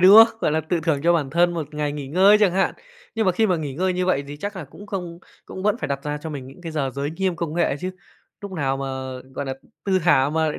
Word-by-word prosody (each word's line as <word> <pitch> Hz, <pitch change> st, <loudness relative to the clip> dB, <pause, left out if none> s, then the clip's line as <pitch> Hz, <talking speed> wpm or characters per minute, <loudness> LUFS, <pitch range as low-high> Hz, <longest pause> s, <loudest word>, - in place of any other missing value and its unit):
đúng 190 Hz, +3 st, +9 dB
không? 225 Hz, 0 st, -9 dB
Gọi -, -, +1 dB
là 160 Hz, -, +2 dB
tự 165 Hz, +2 st, -1 dB
thưởng 160 Hz, -4 st, +1 dB
cho 170 Hz, +1 st, +5 dB
bản 150 Hz, -5 st, 0 dB
thân 175 Hz, +3 st, +3 dB
một 155 Hz, -2 st, -5 dB
ngày 150 Hz, -1 st, -1 dB
nghỉ 145 Hz, -2 st, -6 dB
ngơi 190 Hz, +7 st, +6 dB
chẳng 195 Hz, -4 st, +4 dB
hạn. 190 Hz, +1 st, +1 dB, 0.4 s
Nhưng 220 Hz, -2 st, +1 dB
mà 185 Hz, -, +4 dB
khi 220 Hz, +4 st, +2 dB
mà 180 Hz, -3 st, +2 dB
nghỉ 145 Hz, -4 st, -4 dB
ngơi 185 Hz, +3 st, +1 dB
như 180 Hz, 0 st, -1 dB
vậy 140 Hz, -6 st, +1 dB
thì 145 Hz, -, -7 dB
chắc 200 Hz, +5 st, -5 dB
là 170 Hz, -, -5 dB
cũng 200 Hz, +9 st, -13 dB
không 180 Hz, -4 st, -5 dB, 0.3 s
cũng 190 Hz, -, -8 dB
vẫn 210 Hz, +2 st, +2 dB
phải -, -, -2 dB
đặt 140 Hz, 0 st, -2 dB
ra 150 Hz, 0 st, -2 dB
cho 160 Hz, +2 st, -6 dB
mình 135 Hz, -4 st, -6 dB
những 135 Hz, +7 st, -13 dB
cái 165 Hz, -, -5 dB
giờ 140 Hz, -4 st, -1 dB
giới 140 Hz, +2 st, -2 dB
nghiêm 185 Hz, +1 st, -1 dB
công 165 Hz, -2 st, -3 dB
nghệ 160 Hz, -5 st, +1 dB
chứ. 185 Hz, +1 st, -2 dB, 0.5 s
Núc 200 Hz, -, -6 dB
nào 135 Hz, -6 st, 0 dB
mà, 135 Hz, -, -4 dB, 0.5 s
gọi -, -, -3 dB
nà, 135 Hz, -, -3 dB, 0.3 s
thư 190 Hz, -1 st, +3 dB
thả 145 Hz, -5 st, +4 dB
mà 160 Hz, 0 st, +1 dB
lại 150 Hz, -, -3 dB
165 Hz, 295 wpm, -23 LUFS, 145-185 Hz, 0.5 s, đúng